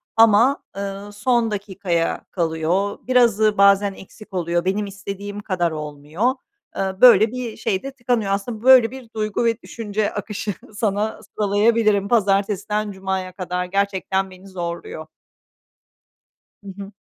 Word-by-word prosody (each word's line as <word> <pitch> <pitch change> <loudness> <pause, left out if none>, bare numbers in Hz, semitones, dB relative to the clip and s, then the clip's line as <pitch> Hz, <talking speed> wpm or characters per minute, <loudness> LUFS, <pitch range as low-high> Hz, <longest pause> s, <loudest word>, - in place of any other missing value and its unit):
ama, 225 +4 +5
ııı, 200 +1 -5
son 230 +2 +1
dakikaya 190 -4 -2
kalıyor. 170 +4 -1
Birazı 225 -4 +3
bazen 200 0 +5
eksik 200 +2 -14
oluyor, 170 -1 -1
benim 200 +2 0
istediğim 200 +1 -7
kadar 180 -5 -1
olmuyor. 150 - -2 0.4
Iıı, 190 -1 -2
böyle 225 -4 +8
bir 240 -1 -6
şey 190 -3 -1
de 275 - -5
tıkanıyor. 240 -6 -1
Aslında 215 +3 -3
böyle 255 -3 +7
bir 260 -3 -10
duygu 215 +1 -1
ve 230 0 0
düşünce 215 -2 -3
akışı 210 -1 -4 0.2
sana 210 0 -1
sıralayabilirim, 210 0 +2
pazartesinden 205 -1 +1
cumaya 190 -1 -4
kadar 180 -1 -3
gerçekten 190 0 -1
beni 185 +1 -14
zorluyor. 170 -3 -6 1.6
Hı - - -13
hı. 195 - -8
200 Hz, 125 wpm, -21 LUFS, 190-220 Hz, 1.6 s, böyle